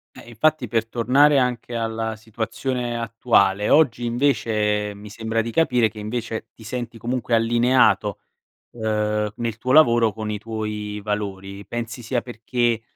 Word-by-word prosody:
Eh, 120 - -12
infatti 150 +3 +1
per 115 0 0
tornare 135 +5 +4
anche 125 -1 -1
alla 115 -1 -2
situazione 115 +3 -3
attuale, 105 -3 +2
oggi 125 -6 +4
invece 110 -5 +1
mi 105 +1 -11
sembra 110 +1 -2
di 115 - -4
capire 125 -4 +2
che 110 - -17
invece 110 +1 -4
ti 110 - -16
senti 120 0 -5
comunque 120 +1 -2
allineato, 115 -2 +3 0.5
uhm, 105 -2 -1
nel 115 -2 -3
tuo 130 +2 -1
lavoro 120 -7 +5
con 110 -1 -4
i 105 - -3
tuoi 105 -1 -4
valori. 100 -1 -4
Pensi 120 +2 -5
sia 120 0 -2
perché 120 0 -1
115 Hz, 145 wpm, -22 LUFS, 105-120 Hz, 0.5 s, lavoro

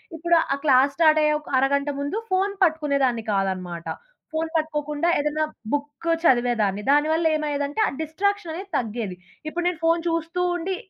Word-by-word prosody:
ఇప్పుడు 340 +2 +2 0.2
ఆ - - +1
class 275 -1 +4
start 310 -1 +5
అయ్యే 300 0 +3
ఒక 300 - -13
అరగంట 280 +2 +1
ముందు 285 +8 -2
ఫోను 385 +2 +1
పట్టుకునేదాన్ని 280 -8 +1
కాదనమాట. 185 -4 -2 0.5
ఫోను 320 0 -2
పట్టుకోకుండా 300 0 -2
ఏదైనా 300 +1 0 0.3
బుక్ 290 +3 -3 0.2
చదివేదాన్ని. 240 - +2
దానివల్ల 310 +3 +2
ఏమయ్యేదంటే, 290 +1 -2
ఆ - - 0
డిస్ట్రాక్షన్ 380 +3 -1
అనేది 380 +4 -7
తగ్గేది. 220 -5 -3 0.3
ఇప్పుడు 345 +3 -3
నేను 355 -3 -1
ఫోను 330 +1 +3
చూస్తూ 330 +2 -1
ఉండి, 370 +3 -3
300 Hz, 150 wpm, -24 LUFS, 265-330 Hz, 0.5 s, start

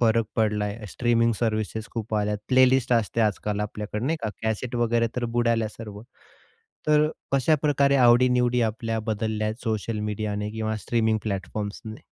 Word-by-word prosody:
फरक 115 -1 +3
पडलाय, 105 -1 0
streaming 115 +1 +2
services 110 -1 -1
खूप 110 -1 -4
आल्या, 105 0 0
प्लेलिस्ट 130 -1 +4
असते 115 0 +1
आजकाल 105 -1 0
आपल्याकडे, 105 +1 -4
नाही 160 +5 0
का. 110 - -1
कॅसेट 110 +3 -2
वगैरे 120 0 +2
तर 125 - -1
बुडाल्या 115 -2 +2
सर्व, 105 -2 -9 0.9
तर 150 0 +4 0.2
कशाप्रकारे 140 0 +3
आवडीनिवडी 125 0 +4
आपल्या 115 0 -1
बदलल्या 110 0 -1
आहेत 110 +3 -4
सोशल 110 0 -2
मीडियाने 105 0 -3
किंवा 110 0 -2
स्ट्रीमिंग 110 0 0
प्लॅटफॉर्म्सने? 105 +2 -5
110 Hz, 140 wpm, -25 LUFS, 105-120 Hz, 0.9 s, प्लेलिस्ट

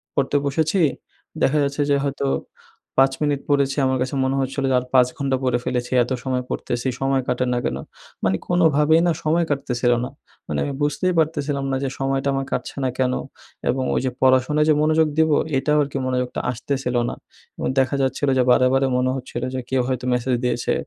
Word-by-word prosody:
পড়তে 140 +1 +1
বসেছি, 160 +6 +1 0.6
দেখা 150 - +3
যাচ্ছে 140 +1 -1
যে 140 - +4
হয়তো 140 0 -2 0.7
পাঁচ 135 0 +5
মিনিট 145 -2 0
পড়েছি। 140 -2 +2
আমার 130 0 +1
কাছে 130 +2 -2
মনে 130 +1 0
হচ্ছিলো 135 +1 -2
যে - - +3
আর 125 - -8
পাঁচ 125 -1 +6
ঘন্টা 135 -1 0
পড়ে 125 -2 +2
ফেলেছি। 125 0 -2
এত 120 - -7
সময় 130 -1 -1
পড়তেছি। 120 +1 -3
সময় 135 0 +2
কাটে 125 0 0
না - - 0
কেন? 65 - -1 0.5
মানে 95 0 +2
কোনভাবেই 160 -2 +4
না - - +3
সময় 165 +2 +2
কাটতেছিল 125 -4 0
না। - - -6 0.4
মানে 75 -2 -2
আমি 140 - -3
বুঝতেই 165 +5 +1
পারতেছিলাম 145 -3 0
না - - +1
যে 135 - 0
সময়টা 135 0 0
আমার 135 0 -1
কাটছে - - -3
না 130 - +1
কেন? 130 -1 +2 0.6
এবং 130 0 0
ওই - - +2
যে 130 - 0
পড়াশোনায় 130 +4 +3
যে - - +6
মনোযোগ 155 +1 +3
দিবো 160 -2 +4 0.2
এটাও 150 +3 +1
আরকি 140 0 -4
মনোযোগটা 125 -1 -1
আসতেছিল 125 +1 -3
না। - - -5 0.4
এবং - - -2
দেখা 130 +1 +1
যাচ্ছিল 135 +2 0
যে 130 - +4
বারে, 130 +1 +5
বারে 135 0 +3
মনে 130 0 +1
হচ্ছিল 125 -2 -5
যে - - -1
কেউ 130 -1 +2
হয়তো 130 -1 -2
মেসেজ 125 +1 0
দিয়েছে। 125 - 0
135 Hz, 195 wpm, -22 LUFS, 130-145 Hz, 0.7 s, পাঁচ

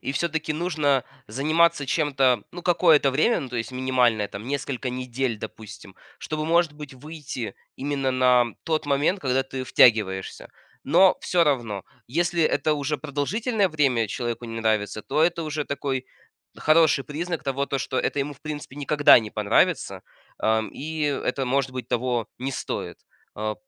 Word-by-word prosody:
и 135 - -3
всё-таки 160 0 -1
нужно 150 -6 +1 0.2
заниматься 155 +2 +2
чем-то, 135 -6 +1
ну, 175 0 -9
какое-то 165 -5 +4
время, 160 - +2
ну, 135 - -6
то 120 - -4
есть 115 +3 -4
минимальное, 125 -4 +1
там, 105 +4 -8
несколько 140 -2 -3
недель 125 -1 -2
допустим, 110 -2 -10 0.2
чтобы, 155 0 -4
может, 170 -2 +3
быть 150 -2 -10
выйти 145 -5 -7 0.2
именно 135 -1 -1
на 125 -1 +4 0.2
тот 155 -2 -1
момент, 145 +7 +1
когда 130 -1 +1
ты 130 0 -6
втягиваешься. 105 -7 +2 0.4
Но 180 +7 +5
всё 175 -2 +2
равно, 115 -9 -1 0.2
если 170 +5 0
это 155 0 +2
уже 145 0 -1
продолжительное 190 - -1
время 130 - +1
человеку 120 +1 -4
не 115 0 -6
нравится, 110 -1 0
то 150 +3 0
это 170 0 +1
уже 155 -1 -3
такой 135 -2 -3 0.5
хороший 155 -3 +3
признак 165 +2 -4
того, 140 0 -1
то 140 - -2
что 130 0 -2
это - - -1
ему, 145 +1 -1
в 140 - -24
принципе, 150 -3 -7
никогда 145 -1 +6
не 110 -2 -5
понравится, 105 -2 +1 0.4
а, 110 0 +2
и 155 +2 -5
это, 140 -2 -1
может 135 0 0
быть, 130 -2 -6
того 120 -2 -1
не 130 +2 -3
стоит, 130 - -5 0.4
а. 110 0 -3
140 Hz, 160 wpm, -24 LUFS, 125-155 Hz, 0.5 s, никогда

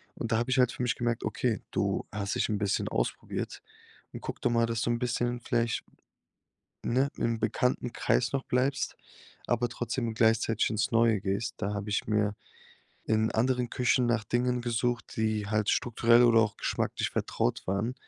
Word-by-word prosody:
Und 115 - -4
da 110 - +3
habe 120 +3 -1
ich 130 - +2
halt 125 -1 +4
für - - -4
mich 120 - +1
gemerkt, 120 -1 -1
okay, 120 -4 -1
du - - 0
hast 100 -1 -2
dich - - 0
'n 105 - 0
bisschen 100 -1 0
ausprobiert - - -3 0.5
und - - -7
guck - - -6
doch - - +2
mal, 115 0 +3
dass 115 +1 -2
du - - 0
'n 120 - 0
bisschen 120 0 -1
vielleicht 115 -1 0 1.0
ne, 130 +4 +2
im 115 -1 0
bekannten 120 +2 0
Kreis 120 0 +1
noch 135 -1 -1
bleibst, 135 +3 0 0.5
aber 120 0 +1
trotzdem 120 -1 -3
gleichzeitig 115 0 +2
ins 110 -1 0
Neue 115 -3 +3
gehst. 100 +3 -2
Da 100 - -2
habe 105 +1 -4
ich 105 - 0
mir 105 -1 +1 0.7
in 110 0 +2
anderen 125 +1 +1
Küchen 125 0 +2
nach 120 -2 +1
Dingen 125 +2 0
gesucht, 120 -1 -1
die 110 -2 0
halt 105 0 0
strukturell 120 0 +4
oder 115 -1 +6
auch 110 -1 0
geschmacklich - - -1
vertraut - - -1
waren. 100 +6 -1
115 Hz, 180 wpm, -29 LUFS, 110-120 Hz, 1.0 s, oder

